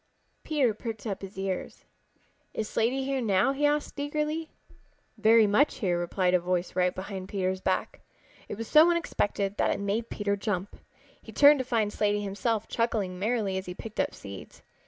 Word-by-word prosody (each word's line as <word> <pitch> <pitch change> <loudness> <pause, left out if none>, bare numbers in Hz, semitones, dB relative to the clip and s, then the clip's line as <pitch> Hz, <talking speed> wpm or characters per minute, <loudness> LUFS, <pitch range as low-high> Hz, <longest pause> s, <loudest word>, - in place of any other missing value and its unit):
Peter 280 -8 +1
pricked 220 -1 -6
up 200 -3 -3
his 195 0 -9
ears. 190 -1 -4 0.7
"Is 215 - -2
Slaty 255 +6 0
here 270 -1 -1
now?" 205 +1 +3
he 290 +2 +2
asked 295 0 -1
eagerly. 300 +2 -2 0.7
"Very 225 0 +5
much 210 +9 +3
here," 175 -4 0
replied 180 +1 0
a 180 - +5
voice 180 0 -2
right 180 0 +2
behind 190 0 -6
Peter's 190 -1 -1
back. - - -1 0.5
It 205 - -5
was 225 0 -5
so 310 +7 +7
unexpected 205 - -1
that - - +2
it - - 0
made 205 +3 -2
Peter 205 -1 -1
jump. 200 -2 -3 0.5
He - - -12
turned 290 0 +7
to 260 - -2
find 225 -5 0
Slaty 205 -1 +1
himself 215 +2 -1
chuckling 210 -6 -1
merrily 205 -3 0
as 190 - -10
he 180 - -6
picked 220 +2 -8
up - - 0
seeds. 100 -2 -10
210 Hz, 180 wpm, -28 LUFS, 190-245 Hz, 0.7 s, so